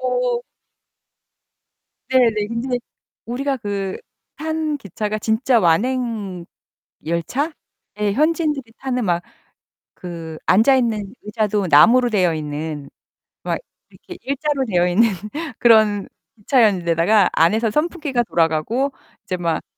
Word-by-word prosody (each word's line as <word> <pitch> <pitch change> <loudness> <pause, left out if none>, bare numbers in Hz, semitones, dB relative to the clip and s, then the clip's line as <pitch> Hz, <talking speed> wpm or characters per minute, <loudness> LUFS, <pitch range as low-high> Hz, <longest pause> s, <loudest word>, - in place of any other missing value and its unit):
어. 250 -1 0 1.7
네네. 230 -5 +3
근데 245 +2 -2 0.5
우리가 270 +4 -2
그 200 -3 -3 0.4
탄 315 -1 -2
기차가 210 - -4
진짜 230 +4 +2
완행열차에 205 0 0 1.7
현지인들이 300 -4 0
타는 250 -4 -2
막 175 -1 +1 0.8
그 165 -3 -7
앉아 225 +8 +5
있는 220 -5 -1
의자도 210 -2 -1
나무로 235 +12 +6
되어 185 -6 +2
있는 150 -1 -5 0.6
막 - - -1 0.3
이렇게 360 - -13
일자로 280 -1 -1
되어 180 -4 +2
있는 200 +6 +4 0.5
그런 215 -4 +4 0.3
기차였는 210 -5 +2
데다가 170 +4 +3
안에서 215 +7 +2
선풍기가 300 - 0
돌아가고 175 - 0 0.3
이제 185 - -3
막 170 -2 -1
220 Hz, 235 characters per minute, -20 LUFS, 180-255 Hz, 1.7 s, 나무로